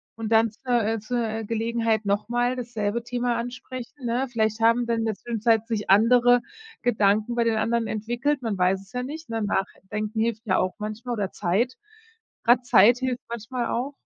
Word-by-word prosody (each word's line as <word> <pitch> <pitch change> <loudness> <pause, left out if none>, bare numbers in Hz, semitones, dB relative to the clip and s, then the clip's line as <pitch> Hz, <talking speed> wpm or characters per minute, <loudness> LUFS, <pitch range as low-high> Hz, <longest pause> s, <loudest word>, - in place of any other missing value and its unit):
und 225 0 -5
dann 225 -1 +4
zur 240 +1 0
äh, 225 +1 0
zur, 240 +4 -3
äh, 220 +1 -3
Gelegenheit 225 -1 0
nochmal 240 +5 0
dasselbe 230 -2 -3
Thema 245 0 -1
ansprechen, 250 +2 -7
ne? 245 +3 0
Vielleicht 220 -1 0
haben 230 +2 +3
dann 230 -1 0
in 225 - -1
der 220 -2 -1
Zwischenzeit 225 0 +1
sich 215 -4 -3
andere 245 +4 +5 0.4
Gedanken 215 0 +2
bei 235 -1 +1
den 225 -1 +2
anderen 230 +1 0
entwickelt, 240 +6 -1
man 215 -4 -2
weiß 185 +1 +3
es 195 +1 -18
ja 250 - -3
nicht, 310 +5 -7
ne? 225 -1 -2
Nachdenken 210 +2 -3
hilft 225 0 -1
ja 185 - +2
auch 185 - 0
manchmal 215 +3 -5
oder 200 -3 -2
Zeit. 210 +8 0 0.7
Grad 240 +1 +5
Zeit 235 +2 +6
hilft 255 -2 -2
manchmal 235 +2 -3
auch. 260 +4 -2
230 Hz, 185 wpm, -25 LUFS, 215-245 Hz, 0.7 s, Zeit